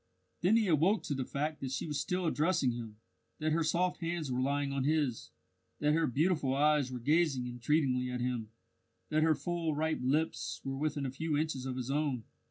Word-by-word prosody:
Then 190 Hz, +7 st, +4 dB
he 220 Hz, -3 st, +2 dB
awoke 175 Hz, +6 st, +3 dB
to -, -, -2 dB
the 130 Hz, -2 st, -2 dB
fact 150 Hz, +2 st, -2 dB
that 135 Hz, -, -3 dB
she 135 Hz, -, -3 dB
was 150 Hz, -3 st, -2 dB
still 180 Hz, +4 st, -1 dB
addressing 155 Hz, -4 st, +2 dB
him, 115 Hz, -3 st, -7 dB, 0.4 s
that 155 Hz, 0 st, 0 dB
her 165 Hz, +1 st, +2 dB
soft 180 Hz, +3 st, 0 dB
hands 165 Hz, -4 st, -2 dB
were 125 Hz, 0 st, 0 dB
lying 140 Hz, +1 st, 0 dB
on 135 Hz, -1 st, 0 dB
his, 145 Hz, -5 st, 0 dB, 0.5 s
that 150 Hz, 0 st, +2 dB
her 165 Hz, 0 st, +2 dB
beautiful 145 Hz, 0 st, +1 dB
eyes 145 Hz, -2 st, +3 dB
were 125 Hz, -, -4 dB
gazing 145 Hz, 0 st, +2 dB
entreatingly 125 Hz, +1 st, +1 dB
at 125 Hz, 0 st, -3 dB
him, 120 Hz, -3 st, -2 dB, 0.6 s
that 155 Hz, -, +2 dB
her 160 Hz, 0 st, +4 dB
full 170 Hz, -3 st, -2 dB
ripe 160 Hz, +1 st, 0 dB
lips 150 Hz, +6 st, 0 dB
were 135 Hz, 0 st, -3 dB
within 145 Hz, 0 st, -1 dB
a 130 Hz, -, -2 dB
few 150 Hz, +2 st, -1 dB
inches 145 Hz, -4 st, -2 dB
of 130 Hz, -, -3 dB
his 130 Hz, +1 st, -3 dB
own. 140 Hz, -5 st, 0 dB
150 Hz, 200 wpm, -32 LUFS, 130-160 Hz, 0.6 s, Then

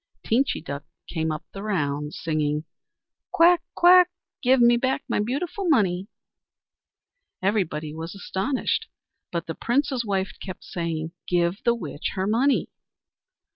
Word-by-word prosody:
Teenchy 260 Hz, +5 st, +1 dB
Duck 140 Hz, +1 st, -5 dB, 0.2 s
came 160 Hz, -1 st, -1 dB
up 155 Hz, 0 st, -5 dB
the 195 Hz, -, -6 dB
rounds, 150 Hz, -8 st, -2 dB
singing: 150 Hz, -2 st, 0 dB, 0.7 s
"Quack! 345 Hz, +1 st, +5 dB
quack! 360 Hz, +1 st, +7 dB, 0.3 s
Give 260 Hz, +1 st, +4 dB
me 240 Hz, 0 st, +6 dB
back 260 Hz, +2 st, 0 dB
my -, -, 0 dB
beautiful 320 Hz, -, -2 dB
money!" 195 Hz, -, +2 dB, 1.4 s
Everybody 160 Hz, -7 st, 0 dB
was 165 Hz, +3 st, -6 dB
astonished, 200 Hz, +6 st, -1 dB, 0.4 s
and 170 Hz, -1 st, -2 dB
the 165 Hz, -, -4 dB
Prince's 260 Hz, -, 0 dB
wife 195 Hz, -3 st, -1 dB
kept 185 Hz, -2 st, -7 dB
saying: 165 Hz, -2 st, -3 dB, 0.2 s
"Give 175 Hz, +2 st, +1 dB
the 235 Hz, -1 st, +3 dB
witch 155 Hz, -9 st, -4 dB
her 190 Hz, -1 st, 0 dB
money." 240 Hz, +7 st, +2 dB
195 Hz, 130 wpm, -25 LUFS, 160-250 Hz, 1.4 s, quack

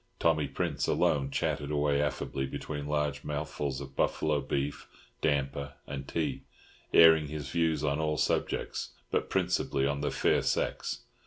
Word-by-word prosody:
Tommy 80 Hz, -3 st, +2 dB
Prince -, -, -1 dB
alone 75 Hz, -6 st, +2 dB
chatted 70 Hz, +1 st, -1 dB
away 75 Hz, -1 st, +2 dB
affably 70 Hz, -2 st, -2 dB
between 75 Hz, +1 st, -5 dB
large 75 Hz, -3 st, -1 dB
mouthfuls 75 Hz, -2 st, -3 dB
of 70 Hz, -1 st, -9 dB
buffalo 75 Hz, -2 st, +1 dB
beef, 70 Hz, +1 st, -2 dB, 0.3 s
damper, 70 Hz, 0 st, 0 dB
and 70 Hz, 0 st, -6 dB
tea, 75 Hz, -5 st, -1 dB, 0.5 s
airing 80 Hz, -2 st, +7 dB
his 75 Hz, -2 st, -5 dB
views 80 Hz, -3 st, +1 dB
on 70 Hz, 0 st, +1 dB
all 75 Hz, -1 st, 0 dB
subjects, -, -, -1 dB, 0.2 s
but -, -, 0 dB
principally 70 Hz, 0 st, +1 dB
on 70 Hz, 0 st, 0 dB
the -, -, 0 dB
fair -, -, +2 dB
sex. -, -, -1 dB
75 Hz, 145 wpm, -30 LUFS, 70-75 Hz, 0.5 s, airing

